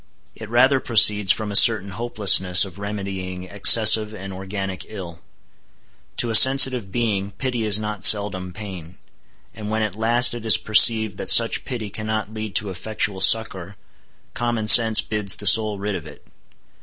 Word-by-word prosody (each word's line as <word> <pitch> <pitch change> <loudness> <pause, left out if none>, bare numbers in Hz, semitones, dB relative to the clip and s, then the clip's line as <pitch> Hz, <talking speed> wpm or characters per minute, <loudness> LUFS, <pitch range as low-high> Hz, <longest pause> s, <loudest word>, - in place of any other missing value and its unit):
It 110 - -14
rather 130 +3 0
proceeds 105 -5 +2
from 110 -2 -5
a - - -8
certain 110 -3 +4
hopelessness 100 -4 0
of 95 0 -15
remedying 95 -3 -9
excessive 105 +3 +3
and 95 -1 -12
organic 95 0 -9
ill. 90 -5 -12 1.0
To 120 - -3
a - - -6
sensitive 130 -5 +4
being, 100 -4 -5
pity 120 +1 -6
is 105 -1 +1
not 105 -2 -9
seldom 100 -3 +3
pain. 95 -4 -13 0.6
And 105 -1 -11
when 110 0 -4
at 105 -3 -6
last 120 +3 -1
it 120 -2 -11
is 110 -6 +4
perceived 110 +2 +2
that - - -7
such 115 -1 +3
pity 115 -6 -9
cannot 110 0 -8
lead 110 -3 -10
to 100 +1 -1
effectual 100 +1 -6
succor, 100 -4 0 0.6
common 120 -2 -6
sense 110 -1 +5
bids 105 -3 -2
the 105 - -12
soul 110 +1 +2
rid 100 +1 -7
of 85 -5 -10
it. - - -18
105 Hz, 160 wpm, -18 LUFS, 95-110 Hz, 1.0 s, sense